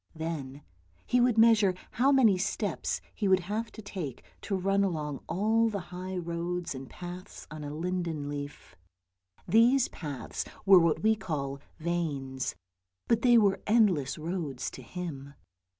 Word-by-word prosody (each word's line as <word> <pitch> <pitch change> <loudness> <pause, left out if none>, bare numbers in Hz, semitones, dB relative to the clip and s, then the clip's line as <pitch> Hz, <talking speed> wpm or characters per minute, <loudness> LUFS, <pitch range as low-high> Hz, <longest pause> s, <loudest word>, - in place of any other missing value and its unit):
Then 150 -4 -5 0.4
he 250 - +3
would 240 -2 +3
measure 220 -4 +5 0.2
how 265 +4 +3
many 245 -8 +5
steps 185 - -2
he 205 - -1
would 190 -1 +4
have 215 +5 -3
to 220 - -10
take 175 - -6 0.2
to 200 - -2
run 195 +2 +2
along 150 -7 -2
all 225 +4 +2
the 205 -2 -3
high 185 +1 -4
roads 170 0 -3
and 130 -1 -8
paths 180 +1 -9
on 155 -1 -7
a 145 - -5
linden 165 -2 -2
leaf. 145 -8 -7 0.7
These 240 +4 +5
paths 145 -6 -5 0.2
were 195 -2 +9
what 165 -1 +2
we 220 0 +4
call 140 -9 -4 0.2
veins, 150 -6 -2 0.5
but 230 0 +3
they 240 -2 +6
were 200 -3 +3
endless 190 - +3
roads 155 -5 -3
to - - -9
him. 140 -1 -7
180 Hz, 150 wpm, -29 LUFS, 150-210 Hz, 0.7 s, were